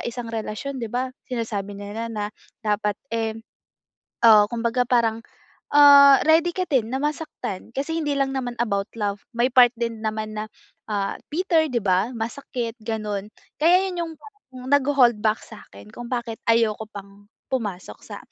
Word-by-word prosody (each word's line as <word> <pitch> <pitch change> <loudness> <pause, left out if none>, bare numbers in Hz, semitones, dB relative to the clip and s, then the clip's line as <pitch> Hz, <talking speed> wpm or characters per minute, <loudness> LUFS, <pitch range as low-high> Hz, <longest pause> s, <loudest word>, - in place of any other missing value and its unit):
isang 240 -1 -5
relasyon 225 +5 -4
di 230 - -4
ba 255 +2 -1 0.2
sinasabi 220 -5 -3
nila 205 +3 -5
na 210 -1 -4 0.3
dapat, 210 -1 0 0.2
eh, 225 -1 -1 0.9
ah, 215 -2 +8
kumbaga 235 +2 0
parang, 230 -2 +2 0.5
ah, 280 -1 +8
ready 325 +2 +5
ka 370 - -1
din 255 -8 +1
na - - +1
masaktan. 295 - -4
Kasi 325 +4 -2
hindi 295 -2 -1
lang 275 -1 +1
naman 245 -2 -3
about 200 -3 -1
love 205 -2 -2 0.2
may 240 +1 +3
part 250 -1 +8
din 230 -2 -3
naman 215 0 -3
na, 215 - -3 0.5
ah, 200 -1 -1 0.2
bitter, 330 -1 +2
di 245 - 0
ba, 190 +3 +2
masakit, 235 0 -4
ganun. 210 -2 -3 0.3
Kaya 355 +5 +5
yun 355 -2 -3
yung 330 - -8
parang 260 -13 -14
nagho-hold 270 -5 +4
back 215 0 +2
sa'kin 100 - -14
kung 240 - -8
bakit 235 -2 -3
ayoko 225 -1 +2
pang 200 0 -12 0.3
pumasok 195 - -4
sa, - - -8
230 Hz, 155 wpm, -23 LUFS, 210-270 Hz, 0.9 s, ah